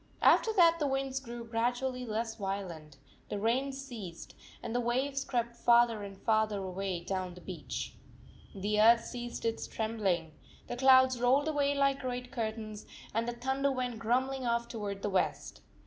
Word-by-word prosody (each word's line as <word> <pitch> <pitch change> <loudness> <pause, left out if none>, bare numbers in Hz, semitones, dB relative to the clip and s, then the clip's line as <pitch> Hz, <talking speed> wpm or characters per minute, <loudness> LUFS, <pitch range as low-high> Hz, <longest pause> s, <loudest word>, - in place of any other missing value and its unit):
After 445 - +6
that 335 -4 +5
the 295 - +1
winds 270 0 -1
grew 240 -3 -7
gradually 245 +2 -1
less 225 +1 -2
violent, 185 -8 -5 0.3
the - - -2
rain 240 +6 +1
ceased, 240 -11 -8 0.3
and 230 - -4
the 245 - +1
waves 265 +3 0
crept 235 -3 -2
farther 235 -2 +4
and 200 -1 -8
farther 220 -1 +1
away 190 -1 -3
down 185 0 -3
the - - -11
beach. 170 -6 -5 0.6
The 210 +2 +1
earth 230 +1 +6
ceased 240 -1 -6
its 225 0 -1
trembling. 200 -8 -1 0.3
The 245 - -5
clouds 260 -1 +6
rolled 265 +4 +4
away 285 -2 +1
like 275 -1 +2
great 250 -1 -4
curtains, 220 -3 -4 0.3
and 230 +1 0
the 240 - -1
thunder 265 +3 0
went 250 -3 -2
grumbling 260 +4 0
off 235 -1 0
toward 205 -4 -5
the 205 - 0
west. 190 - -1
235 Hz, 165 wpm, -31 LUFS, 210-260 Hz, 0.6 s, After